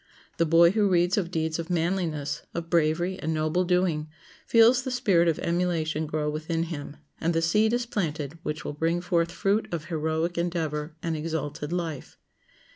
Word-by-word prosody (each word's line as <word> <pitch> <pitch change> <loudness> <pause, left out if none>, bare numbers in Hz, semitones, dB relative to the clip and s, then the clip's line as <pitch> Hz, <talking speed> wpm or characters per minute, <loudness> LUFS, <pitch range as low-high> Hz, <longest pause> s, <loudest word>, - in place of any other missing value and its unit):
The 165 - +2
boy 170 +2 +6
who 205 -1 +2
reads 175 0 +3
of 185 -5 -1
deeds 160 -1 -1
of 165 +1 -5
manliness, 165 -4 -1
of 170 0 -5
bravery 170 +3 +1
and 160 +1 -2
noble 155 +3 +1
doing, 175 -4 +1 0.4
feels 235 +2 +6
the 260 - -4
spirit 200 -10 +3
of 165 - +2
emulation 165 -3 -1
grow 150 0 -2
within 155 +2 -1
him, 150 -3 -6 0.2
and 165 +1 0
the - - +3
seed 210 +7 +3
is 240 0 0
planted 160 - -3
which 150 -1 -4
will - - -3
bring 165 +3 0
forth 170 -1 0
fruit 200 +4 0
of 165 -3 -3
heroic 160 +1 -1
endeavor 160 -3 -2
and 165 -1 -1
exalted 150 -1 -4
life. 165 -5 -4
165 Hz, 175 wpm, -26 LUFS, 155-180 Hz, 0.4 s, boy